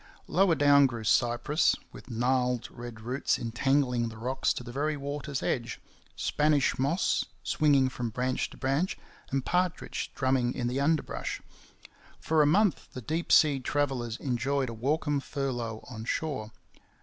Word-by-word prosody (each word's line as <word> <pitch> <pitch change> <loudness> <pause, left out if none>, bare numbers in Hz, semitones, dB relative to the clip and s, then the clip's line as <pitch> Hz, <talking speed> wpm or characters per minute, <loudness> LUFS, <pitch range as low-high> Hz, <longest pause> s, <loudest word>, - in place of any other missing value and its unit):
Lower 180 -1 +3
down 145 -1 +6
grew 115 -3 -6
cypress, 120 - +2 0.2
with - - -13
gnarled 125 +1 0
red 120 -2 -9
roots 125 +5 0
entangling 125 0 +1
the 110 - -10
rocks 130 +4 0
to - - -6
the 120 - -8
very 150 +4 -1
water's 140 0 -4
edge, 120 -1 -2 0.4
Spanish 150 -4 +1
moss 145 +8 +1 0.2
swinging 145 -4 +3
from 125 -2 -3
branch 125 +3 -1
to - - -14
branch, 140 +7 0 0.3
and 135 -1 -1
partridge 180 0 -1
drumming 130 -2 +1
in 120 - -2
the 125 +3 -1
underbrush. 155 +1 -1 0.8
For 160 -1 +2
a 150 - +5
month 195 +5 +2
the 130 - -6
deep 160 +7 -2
sea 145 -3 +6
travellers 130 -4 -1
enjoyed 130 +1 -1
a - - -5
welcome 145 +5 0
furlough 125 -5 -4
on 110 -3 -7
shore. 130 -7 -2
135 Hz, 150 wpm, -29 LUFS, 120-145 Hz, 0.8 s, down